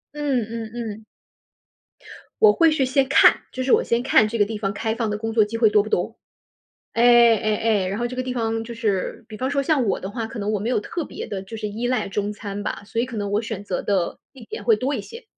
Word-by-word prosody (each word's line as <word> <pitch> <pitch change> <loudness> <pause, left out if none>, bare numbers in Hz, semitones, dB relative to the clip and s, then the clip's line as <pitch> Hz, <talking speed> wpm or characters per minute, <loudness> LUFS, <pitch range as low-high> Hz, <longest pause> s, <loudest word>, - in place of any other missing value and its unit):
嗯 285 -4 0
嗯 225 -1 -6
嗯。 220 -2 -6 1.4
我 435 -1 +8
会 330 -2 +4
去 295 -4 +1
先 265 +1 +2
看， 280 - +5
就 260 - -3
是 255 - 0
我 - - +5
先 235 +1 0
看 225 -4 +4
这 230 +2 -3
个 205 - +4
地 220 +1 -5
方， 200 -2 -2
开 220 +2 -2
放 225 -1 -2
的 210 - -2
工 225 +1 -3
作 220 -2 +4
机 225 +2 -4
会 225 -1 +5
多 210 0 +4
不 215 - -7
多。 220 +5 -1 0.8
哎 235 -1 +6
哎 215 0 0
哎， 215 -4 +1
然 195 +3 -3
后 240 - 0
这 250 - -6
个 255 - -1
地 255 0 -4
方， 225 -2 -1
就 235 +1 -7
是， 215 -2 -2
比 215 - -8
方 260 +4 -2
说 280 -1 +1
像 275 -4 +1
我 195 - 0
的 190 - -5
话， 225 +1 -4
可 225 - -8
能 210 +1 -1
我 210 - 0
没 215 - -2
有 250 - +1
特 335 +9 -4
别 - - -7
地 200 -3 -5
就 210 +4 -8
是 215 -1 -4
依 225 +4 -3
赖 250 -3 0
中 205 +1 -2
餐 205 -1 -6
吧， - - -4
所 225 +3 -2
以 245 - 0
可 240 - -8
能 205 -1 -2
我 205 +1 +1
选 220 -3 -5
择 190 -3 -3
的 190 -4 -1
地 260 -4 -13
点 205 - -7
会 225 -1 +4
多 260 +6 -1
一 - - -2
些。 465 +1 -11
225 Hz, 290 characters per minute, -23 LUFS, 210-245 Hz, 1.4 s, 我